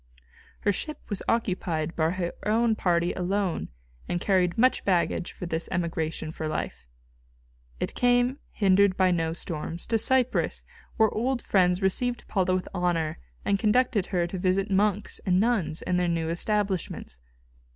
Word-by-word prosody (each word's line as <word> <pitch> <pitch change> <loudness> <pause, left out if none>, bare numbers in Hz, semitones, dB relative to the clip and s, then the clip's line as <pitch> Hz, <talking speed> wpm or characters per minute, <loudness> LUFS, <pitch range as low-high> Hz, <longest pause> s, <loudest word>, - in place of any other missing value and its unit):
Her 205 - +2
ship 305 - -2
was 205 -3 -2
occupied 180 -7 -1
by 160 -1 +2
her 175 -1 -2
own 225 +1 +3
party 175 -3 +1
alone, 190 0 -1 0.4
and 175 - 0
carried 185 0 +1
much 255 +3 +3
baggage 175 -1 +1
for - - -7
this 165 -1 -3
emigration 165 -3 -2
for 160 -1 -4
life. 155 - -4 0.9
It - - -3
came, 245 +2 +2
hindered 195 -1 +3
by 185 -1 +4
no 165 -2 0
storms, 165 0 -4
to 225 -1 +1
Cyprus, 255 +2 +2 0.3
where 220 -2 +4
old 245 +2 -1
friends 180 -1 +2
received 240 +6 0
Paula 185 -2 +1
with 185 - -3
honour, 175 -4 -1 0.3
and 200 -1 +2
conducted 220 -2 +2
her 175 -3 0
to 180 +2 -5
visit 190 +2 +1
monks 205 +1 +1
and 185 -2 +2
nuns 190 -9 +1
in 180 -1 0
their 180 0 +1
new 165 -1 -1
establishments. 190 - -2
185 Hz, 150 wpm, -27 LUFS, 170-210 Hz, 0.9 s, by